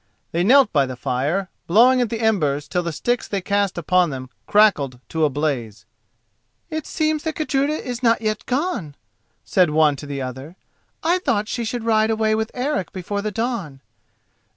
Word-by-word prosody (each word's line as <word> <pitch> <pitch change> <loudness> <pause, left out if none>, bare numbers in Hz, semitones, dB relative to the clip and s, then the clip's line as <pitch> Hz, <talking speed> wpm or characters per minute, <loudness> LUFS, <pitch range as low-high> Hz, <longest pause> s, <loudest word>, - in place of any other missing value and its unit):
They 170 +1 0
knelt 260 +3 +5
by 140 -3 +3
the 130 - -6
fire, 150 +11 -1 0.2
blowing 245 +8 +5
at 240 - 0
the 230 0 -3
embers 150 -10 +1
till 180 - 0
the 170 -1 -3
sticks 240 +10 -1
they 200 - -2
cast 200 0 0
upon 180 +1 +2
them 130 -2 -7 0.2
crackled 150 - +3
to 160 -1 +1
a - - +2
blaze. 130 -7 -3 0.9
"It 315 -1 -4
seems 310 -1 0
that 320 0 -3
Gudruda 290 -1 0
is 250 -5 -5
not 230 -2 +3
yet 215 -1 -3
gone," 255 - -2 0.5
said 180 -3 +3
one 150 -1 +3
to 145 - -9
the 140 -1 -4
other. 130 +5 -6 0.5
"I 345 +3 +2
thought 225 - 0
she 240 +1 -3
should 230 +1 -3
ride 220 -1 +2
away 220 -1 +1
with 220 +1 -1
Eric 255 -6 -2
before 200 +2 -4
the 215 - -2
dawn." 210 - -3
205 Hz, 180 wpm, -21 LUFS, 150-240 Hz, 0.9 s, knelt